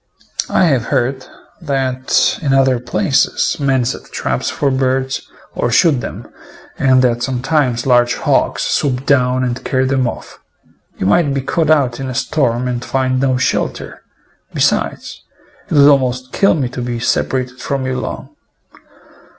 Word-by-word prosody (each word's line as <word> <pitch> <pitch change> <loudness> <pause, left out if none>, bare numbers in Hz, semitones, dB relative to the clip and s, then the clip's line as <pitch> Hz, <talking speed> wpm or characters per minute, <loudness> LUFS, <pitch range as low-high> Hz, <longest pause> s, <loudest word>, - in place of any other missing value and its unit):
I - - +2
have 135 -8 +1
heard 130 0 -1 0.3
that 130 -4 0
in 140 -4 0
other 135 -2 +3
places 135 - 0
men 135 -3 +1
set 125 - -4
traps - - -2
for 140 -2 -1
birds 130 0 0 0.3
or - - -1
shoot 135 +2 +3
them, - - -7 0.5
and 130 -1 +4
that 120 -1 +1
sometimes 130 -1 0
large 120 -1 +3
hawks - - 0
swoop 135 -2 -1
down 130 -2 +2
and 125 -1 -3
carry 130 -1 0
them 130 -1 +1
off. - - -8 0.6
You - - -3
might 140 - +3
be 135 - 0
caught 155 +4 -1
out 135 -6 +2
in 135 -1 -4
a 130 - -5
storm 125 -5 0
and 125 0 -3
find 130 -1 0
no 130 -1 +1
shelter; 130 - -2 0.5
besides, - - -1 0.5
it - - -1
would 140 -1 +7
almost 130 -2 +2
kill 195 - +3
me 140 -5 -1
to 125 0 -6
be 120 -1 -3
separated 125 +1 -1
from 135 -2 -2
you 130 0 -2
long. - - -7
130 Hz, 155 wpm, -16 LUFS, 125-135 Hz, 0.6 s, would